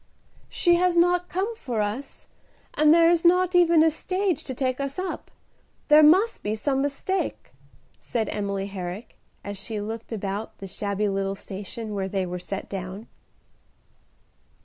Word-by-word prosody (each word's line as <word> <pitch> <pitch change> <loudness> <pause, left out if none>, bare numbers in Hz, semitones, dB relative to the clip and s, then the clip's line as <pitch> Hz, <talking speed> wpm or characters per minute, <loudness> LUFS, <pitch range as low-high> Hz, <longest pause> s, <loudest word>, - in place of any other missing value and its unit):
"She 345 -1 +3
has 360 0 +2
not 355 +1 +3
come 400 +6 -2
for 245 - -4
us, 210 +7 -4 0.5
and 305 0 +4
there 335 +1 +6
is 340 -1 +2
not 360 +1 +4
even 340 -2 +5
a 320 - +4
stage 370 0 -1
to 260 - -5
take 255 0 -1
us 275 0 -3
up. 370 0 -4 0.6
There 300 +1 +8
must 375 +10 +5
be 210 +1 -2
some 270 +5 0
mistake," 285 +7 -2 0.5
said 225 -3 -2
Emily 200 -1 -2
Herrick, 195 +2 -7 0.2
as 200 -1 -6
she 210 +1 -5
looked 225 +3 -6
about 205 0 -4
the 195 - -8
shabby 200 +2 -2
little 195 0 -1
station 205 +3 -7
where 195 -1 -2
they 190 -1 -1
were 180 0 -5
set 195 +2 -6
down. 195 +3 -7
240 Hz, 155 wpm, -25 LUFS, -, 0.6 s, There